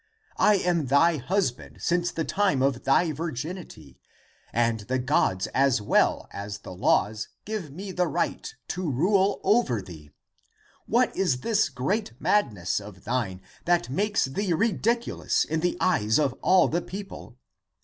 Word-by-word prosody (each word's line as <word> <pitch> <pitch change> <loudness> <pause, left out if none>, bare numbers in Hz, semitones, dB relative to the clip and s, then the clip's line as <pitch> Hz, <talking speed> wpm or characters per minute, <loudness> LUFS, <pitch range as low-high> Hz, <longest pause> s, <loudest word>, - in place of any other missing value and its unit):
I 210 - +5
am 175 -6 0
thy 155 +5 +4
husband 145 -1 -2
since 175 0 0
the 165 -2 -3
time 190 -10 +1
of 135 -2 0
thy 155 +5 +3
virginity, 155 - -6 0.5
and 115 -1 +1
the 125 +6 -2
gods 125 -8 +1
as 135 -3 +3
well 105 - +2
as 100 0 -6
the 95 - -10
laws 105 +4 +1 0.2
give 210 -7 -4
me 190 +7 -7
the 180 -1 0
right 170 +2 -2 0.2
to 180 -3 -2
rule 190 - +2
over 195 - +2
thee. 80 -6 -11 0.8
What 240 +1 +2
is 150 -10 0
this 220 - +1
great 140 - -2
mad 210 - +2
ness 90 -2 -2
of 100 -2 -12
thine 110 -6 -2 0.2
that 170 -8 +1
makes 205 +8 +1
thee 175 +8 -1
ridiculous 230 +5 0
in 160 +1 -1
the 175 +2 0
eyes 110 -12 +2
of 145 -5 +1
all 185 0 +5
the 170 +3 -1
people? 195 -11 -9
155 Hz, 150 wpm, -26 LUFS, 120-185 Hz, 0.8 s, I